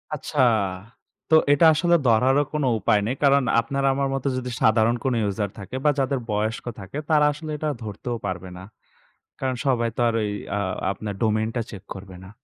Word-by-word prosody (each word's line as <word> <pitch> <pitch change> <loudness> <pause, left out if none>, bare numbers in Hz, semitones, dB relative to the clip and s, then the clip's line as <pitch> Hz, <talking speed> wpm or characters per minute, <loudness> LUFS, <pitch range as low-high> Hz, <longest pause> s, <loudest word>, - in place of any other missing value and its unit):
আচ্ছা, 150 0 -5 0.9
তো 160 - +6 0.2
এটা 145 +3 +5
আসলে 170 +3 +3
ধরারও 130 +5 +4
কোন 150 -2 -1 0.2
উপায় 105 +1 +3
নেই। 125 +4 -1
কারণ 140 -1 +5 0.2
আপনার 135 +4 -2
আমার 140 0 0
মত 135 - -3
যদি 125 0 -4
সাধারণ 110 +2 +4
কোন 130 -2 +1 0.2
user 100 0 -2
থাকে 100 +6 -8
বা 150 - +4
যাদের 135 0 0
বয়স্ক 110 +3 -2
থাকে, 95 +8 -8
তারা 150 -1 +4
আসলে 155 +1 -7
এটা 155 0 -2
ধরতেও 115 +3 -5
পারবে 90 -1 -4
না। 95 - -10 0.8
কারণ 130 -1 -1
সবাই 120 -3 +2
তো - - -8
আর 115 - +1
ওই 105 - -1 0.3
আ - - 0 0.3
আপনার 100 +1 -5
domain 110 0 +1
টা 120 - 0
check 100 -3 -9
করবে 95 -1 -10
না। 95 - -11
120 Hz, 190 wpm, -24 LUFS, 105-140 Hz, 0.9 s, তো